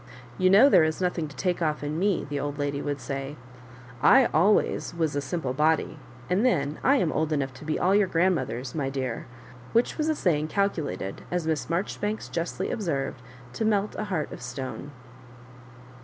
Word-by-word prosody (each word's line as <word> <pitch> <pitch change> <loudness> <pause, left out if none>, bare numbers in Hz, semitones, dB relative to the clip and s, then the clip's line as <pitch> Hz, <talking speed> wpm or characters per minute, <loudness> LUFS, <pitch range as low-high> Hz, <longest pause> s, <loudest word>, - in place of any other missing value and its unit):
*' 120 -1 -20
You 185 - +4
know 200 +8 +8
there 175 - +6
is 155 0 0
nothing 180 -3 -1
to 145 - -13
take 180 -2 -1
off 155 -2 0
in 150 +3 -2
m?," 200 -2 +1
the 145 0 -3
old 145 0 -3
lady 145 -1 -2
would 145 -1 -3
say; 135 +1 -5 0.3
" 125 0 -18 0.2
I 265 - +6
always 180 0 +2
was 160 -3 0
a 145 - 0
simple, 135 -2 -3
body; 155 +2 +1 0.3
and 185 - +1
then 150 - +1
I 275 - +5
am 180 - +1
old 155 0 -1
enough 140 -3 -1
to 130 +4 -12
be 155 - -1
all 185 +2 +2
your 205 -1 +4
grandmothers, 145 -9 0
my 140 -4 -1
dear 130 -4 -4 0.2
;" 125 0 -18
which 235 +7 +2
was 310 +1 +1
a 315 - +2
saying 155 - +1
calculated, 155 - -2
as 175 -2 -1
Miss 160 -2 -1
Marjoribanks 205 +4 -2
justly 170 +2 -3
observed, 140 - -2 0.3
to - - -2
melt 210 -1 +1
a 215 - -4
heart 180 -7 -2
of - - -8
stone. 130 +2 -6
155 Hz, 200 wpm, -26 LUFS, 140-185 Hz, 0.3 s, know